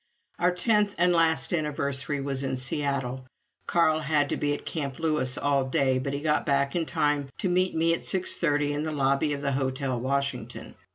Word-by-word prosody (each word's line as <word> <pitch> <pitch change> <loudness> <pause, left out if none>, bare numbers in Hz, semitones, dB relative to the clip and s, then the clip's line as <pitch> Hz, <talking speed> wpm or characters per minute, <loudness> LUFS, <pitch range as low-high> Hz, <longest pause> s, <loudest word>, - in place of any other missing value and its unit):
Our 180 +1 +3
tenth 205 +2 +1
and 180 +1 +3
last 165 +1 +2
anniversary 145 -2 -2
was 135 -1 -3
in 130 -1 -2
Seattle. 130 -1 -2 0.4
Carl 160 -2 +3
had 150 -2 +1
to - - 0
be 145 - -1
at - - -10
Camp 140 -4 -4
Lewis 150 -6 0
all 140 -2 +1
day, 130 0 +1
but 135 +2 -3
he 140 +1 -3
got 150 0 +1
back 140 +1 +1
in 165 -2 0
time 145 -2 0
to - - -1
meet 185 0 +1
me 165 +1 +3
at 165 - -4
six 185 -1 +1
thirty 145 -3 +1
in 145 - -2
the 155 0 -2
lobby 140 +1 +1
of 140 0 -5
the 140 - 0
Hotel 130 -1 -1
Washington. 140 +2 -3
145 Hz, 195 wpm, -27 LUFS, 135-160 Hz, 0.4 s, Our